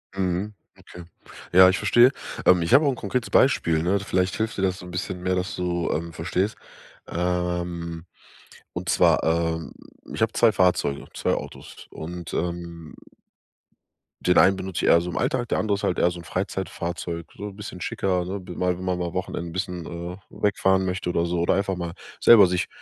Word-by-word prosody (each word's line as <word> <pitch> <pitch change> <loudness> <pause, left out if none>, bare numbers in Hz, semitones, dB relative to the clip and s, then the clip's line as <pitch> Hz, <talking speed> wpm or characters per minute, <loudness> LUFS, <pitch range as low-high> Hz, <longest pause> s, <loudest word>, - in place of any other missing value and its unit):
Mhm. 95 +2 -1 0.2
Okay. 90 - -12 0.5
Ja, 95 +1 +8
ich 95 - +1
verstehe. 120 +2 +5 0.3
Ähm, 90 -1 +6
ich 85 - 0
hab 140 - +8
auch 145 - +2
'n 130 - -4
konkretes 115 +3 -3
Beispiel, 85 - +3
ne. 95 +4 +2
Vielleicht 95 -1 0
hilft 110 0 -2
dir - - -1
das 95 0 0
so'n 90 - -10
bisschen 90 0 -4
mehr, 90 0 0
dass 90 +2 -2
du, 90 -1 -1
ähm, 85 +1 -3
verstehst. 95 +5 -1 0.5
Ähm, 90 -1 -2 0.7
und - - -5
zwar, - - +4
ähm, 80 0 -1 0.4
ich - - -5
hab - - -1
2 115 -2 +5
Fahrzeuge, 90 -7 +1
2 - - 0
Autos - - -9
und, 85 +1 -7
ähm 85 -2 -4 1.3
Den 90 - +3
einen 95 - +6
benutz 95 -2 -6
ich - - 0
eher 85 - +6
so 90 - -5
im - - -5
Alltag, 120 -2 -1
der - - +1
andere 105 -2 +1
ist - - -6
halt 90 - 0
eher 85 - +4
so 85 0 -7
'n - - -10
Freizeitfahrzeug, 85 -2 -4
so 105 0 -6
bisschen 100 -2 -9
schicker 90 -1 -1
also 95 +3 -3
mal 90 0 -2
mal 90 0 -2 0.2
Wochenenden 85 -2 -4
bisschen, 90 -1 -4
äh, 85 +1 -6
wegfahren 95 -2 +1
möchte 90 -1 -2
oder 85 -1 +1
so 85 0 -1
oder 85 - +2
einfach 95 -1 0
mal 85 -1 -4 0.3
selber 105 -5 +8
sich 90 0 -1
90 Hz, 185 wpm, -24 LUFS, 85-95 Hz, 1.3 s, Ja